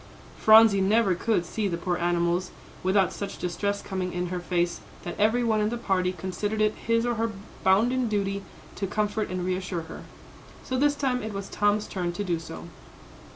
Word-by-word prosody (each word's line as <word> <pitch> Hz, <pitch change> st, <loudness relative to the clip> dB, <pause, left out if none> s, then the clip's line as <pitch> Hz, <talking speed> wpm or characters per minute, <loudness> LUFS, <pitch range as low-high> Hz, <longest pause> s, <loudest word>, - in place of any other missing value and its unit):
Phronsie 220 Hz, -2 st, +7 dB
never 200 Hz, 0 st, +3 dB
could 180 Hz, 0 st, 0 dB
see 210 Hz, +3 st, -2 dB
the 170 Hz, -3 st, -2 dB
poor 175 Hz, +1 st, -1 dB
animals, 175 Hz, +1 st, 0 dB, 0.3 s
without 190 Hz, +1 st, +2 dB
such 200 Hz, -1 st, -5 dB
distress 200 Hz, +3 st, -2 dB
coming 185 Hz, -2 st, -3 dB
in 180 Hz, 0 st, -2 dB
her 180 Hz, 0 st, -2 dB
face 175 Hz, -1 st, -1 dB, 0.2 s
that 175 Hz, -, -4 dB
every 220 Hz, +4 st, +3 dB
one 220 Hz, -2 st, +2 dB
in 210 Hz, -, +1 dB
the 240 Hz, -, -3 dB
party 185 Hz, -5 st, 0 dB
considered 190 Hz, +4 st, -3 dB
it 215 Hz, 0 st, +3 dB
his 230 Hz, +1 st, 0 dB
or 240 Hz, -, +1 dB
her 230 Hz, 0 st, 0 dB, 0.3 s
bounden 235 Hz, +6 st, +3 dB
duty 200 Hz, -2 st, -1 dB, 0.4 s
to 195 Hz, -, -2 dB
comfort 210 Hz, +2 st, -1 dB
and 180 Hz, 0 st, -3 dB
reassure 185 Hz, -1 st, -2 dB
her. 160 Hz, -, -9 dB, 0.6 s
So 260 Hz, -, -3 dB
this 290 Hz, +2 st, +3 dB
time 265 Hz, -3 st, 0 dB
it 215 Hz, 0 st, -5 dB
was 195 Hz, 0 st, -5 dB
Tom's 205 Hz, 0 st, +1 dB
turn 175 Hz, -2 st, -3 dB
to 205 Hz, -, -3 dB
do 175 Hz, -4 st, -1 dB
so. 80 Hz, -, -8 dB
200 Hz, 190 wpm, -26 LUFS, 180-220 Hz, 0.6 s, Phronsie